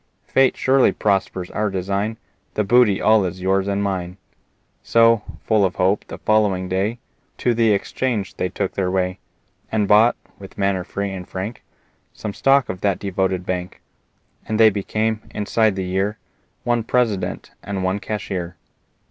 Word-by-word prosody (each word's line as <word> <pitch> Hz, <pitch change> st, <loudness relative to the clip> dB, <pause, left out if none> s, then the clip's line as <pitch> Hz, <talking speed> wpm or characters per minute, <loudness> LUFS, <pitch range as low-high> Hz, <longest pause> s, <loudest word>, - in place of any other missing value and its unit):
Fate 135 Hz, -1 st, +3 dB
surely 130 Hz, 0 st, +4 dB
prospers 95 Hz, -3 st, -1 dB
our 105 Hz, 0 st, 0 dB
design 100 Hz, +3 st, -2 dB, 0.4 s
The 105 Hz, -, +1 dB
booty 110 Hz, -1 st, +4 dB
all 110 Hz, -1 st, +4 dB
is 90 Hz, 0 st, -4 dB
yours 95 Hz, +1 st, +1 dB
and 100 Hz, 0 st, 0 dB
mine." 90 Hz, -2 st, -3 dB, 0.6 s
So, 115 Hz, -1 st, +4 dB, 0.2 s
full 110 Hz, -2 st, +3 dB
of 95 Hz, -1 st, 0 dB
hope, 95 Hz, +3 st, +1 dB
the -, -, -7 dB
following 105 Hz, -4 st, +1 dB
day 95 Hz, +5 st, -1 dB, 0.4 s
To 120 Hz, -, +1 dB
the 115 Hz, -1 st, +3 dB
exchange 105 Hz, 0 st, -1 dB
they 90 Hz, -, -2 dB
took 100 Hz, 0 st, -3 dB
their 95 Hz, -2 st, -1 dB
way 90 Hz, 0 st, -1 dB, 0.5 s
And 105 Hz, -2 st, +1 dB
bought, 110 Hz, +4 st, +5 dB, 0.2 s
with 95 Hz, -1 st, -12 dB
manner 100 Hz, -2 st, 0 dB
free 100 Hz, +1 st, -4 dB
and 90 Hz, -2 st, -7 dB
frank, 100 Hz, +5 st, -5 dB, 0.5 s
Some 105 Hz, -, -5 dB
stock 135 Hz, 0 st, +3 dB
of 90 Hz, -1 st, -6 dB
that 100 Hz, -3 st, +1 dB
devoted 95 Hz, -2 st, -1 dB
bank; 90 Hz, -1 st, -4 dB, 0.7 s
And 110 Hz, 0 st, -1 dB
they 110 Hz, -1 st, +7 dB
became, 110 Hz, +2 st, -1 dB
inside 105 Hz, 0 st, +1 dB
the 95 Hz, -1 st, -3 dB
year, 95 Hz, +4 st, -1 dB, 0.5 s
One 120 Hz, -1 st, +1 dB
President 110 Hz, -7 st, -1 dB
and 100 Hz, -2 st, -4 dB
one 95 Hz, +2 st, 0 dB
Cashier. 95 Hz, -5 st, -4 dB
100 Hz, 155 wpm, -21 LUFS, 95-110 Hz, 0.7 s, they